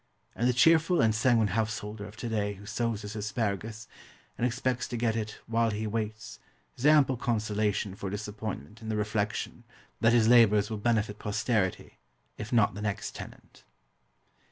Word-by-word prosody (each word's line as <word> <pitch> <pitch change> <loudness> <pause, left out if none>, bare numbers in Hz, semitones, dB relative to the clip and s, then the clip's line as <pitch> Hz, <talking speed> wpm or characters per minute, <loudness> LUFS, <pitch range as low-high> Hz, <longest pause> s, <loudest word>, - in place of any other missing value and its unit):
And 120 +2 +1
the - - +3
cheerful 165 +7 +4
and 110 -1 +4
sanguine 110 -1 +3
householder 105 0 -3
of 105 +1 -13
to 120 - -4
day 105 -2 -1
who 100 +2 -13
sows 110 0 -2
his 105 +1 -7
asparagus, 110 0 -3 0.5
and 125 - +1
expects 125 0 -1
to 120 - -4
get 115 -1 +1
it 110 -1 -4
"while 115 0 +1
he 105 +1 -3
waits" 110 - -4 0.4
has 130 - 0
ample 145 -4 +5
consolation 105 -4 -1
for 100 -1 -5
disappointment 105 - -6
in 110 - -6
the 110 - -1
reflection 105 0 -2 0.4
that 115 +2 +4
his 115 -2 +4
labours 110 -3 +5
will 110 - -3
benefit 105 -2 0
posterity, 105 -2 -1 0.4
if 110 0 -7
not 115 -7 +3
the 100 - -7
next 105 -2 -3
tenant. - - -11
110 Hz, 165 wpm, -29 LUFS, 105-115 Hz, 0.5 s, ample